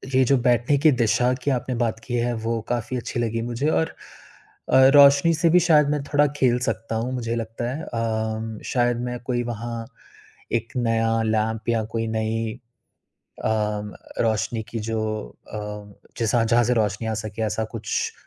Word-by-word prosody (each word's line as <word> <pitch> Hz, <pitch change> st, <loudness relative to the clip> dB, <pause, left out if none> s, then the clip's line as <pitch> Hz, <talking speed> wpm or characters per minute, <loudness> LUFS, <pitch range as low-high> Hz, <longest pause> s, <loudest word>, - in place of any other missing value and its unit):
ये 130 Hz, -, +5 dB
जो 135 Hz, +2 st, +4 dB
बैठने 120 Hz, +3 st, +3 dB
की 155 Hz, +1 st, +5 dB
दिशा 125 Hz, 0 st, +2 dB
की 145 Hz, -, +1 dB
आपने 130 Hz, 0 st, -1 dB
बात 115 Hz, -2 st, -1 dB
की 125 Hz, -, -5 dB
है, 120 Hz, 0 st, 0 dB
वो 115 Hz, 0 st, -2 dB
काफ़ी 120 Hz, +1 st, -2 dB
अच्छी 120 Hz, 0 st, -4 dB
लगी 115 Hz, 0 st, -1 dB
मुझे 120 Hz, +5 st, -1 dB
और 160 Hz, 0 st, +2 dB, 0.8 s
अ, 130 Hz, 0 st, +7 dB
रोशनी 140 Hz, +3 st, +7 dB
से 170 Hz, +1 st, +2 dB
भी 180 Hz, -, +6 dB
शायद 155 Hz, -4 st, +4 dB
मैं 150 Hz, -1 st, 0 dB
थोड़ा 145 Hz, +1 st, +3 dB
खेल 125 Hz, -3 st, +3 dB
सकता 115 Hz, 0 st, -4 dB
हूँ, 120 Hz, +3 st, -2 dB
मुझे 115 Hz, -2 st, -2 dB
लगता 115 Hz, +1 st, -4 dB
है। 160 Hz, -, -6 dB
अ, 110 Hz, -2 st, -2 dB
म 110 Hz, -1 st, -6 dB
शायद 120 Hz, -1 st, +1 dB
मैं 125 Hz, 0 st, -4 dB
कोई 120 Hz, -1 st, 0 dB
वहाँ 115 Hz, 0 st, -5 dB, 0.7 s
एक 115 Hz, -1 st, -1 dB
नया 115 Hz, -1 st, +1 dB
लैंप 110 Hz, +1 st, -1 dB
या 115 Hz, -1 st, +1 dB
कोई 115 Hz, 0 st, 0 dB
नई 110 Hz, 0 st, -1 dB, 0.9 s
अ, -, -, +2 dB, 0.7 s
रोशनी 110 Hz, 0 st, 0 dB
की 115 Hz, -, -3 dB
जो 110 Hz, 0 st, -1 dB, 0.5 s
अ, -, -, -4 dB, 0.6 s
जैसा 115 Hz, 0 st, +2 dB
जहाँ 120 Hz, +1 st, +3 dB
से 125 Hz, +2 st, +2 dB
रोशनी 110 Hz, 0 st, 0 dB
आ 110 Hz, -, -1 dB
सके 110 Hz, +1 st, -5 dB
ऐसा 110 Hz, +1 st, -1 dB
कुछ 110 Hz, -1 st, -2 dB
115 Hz, 175 wpm, -23 LUFS, 110-125 Hz, 0.9 s, अ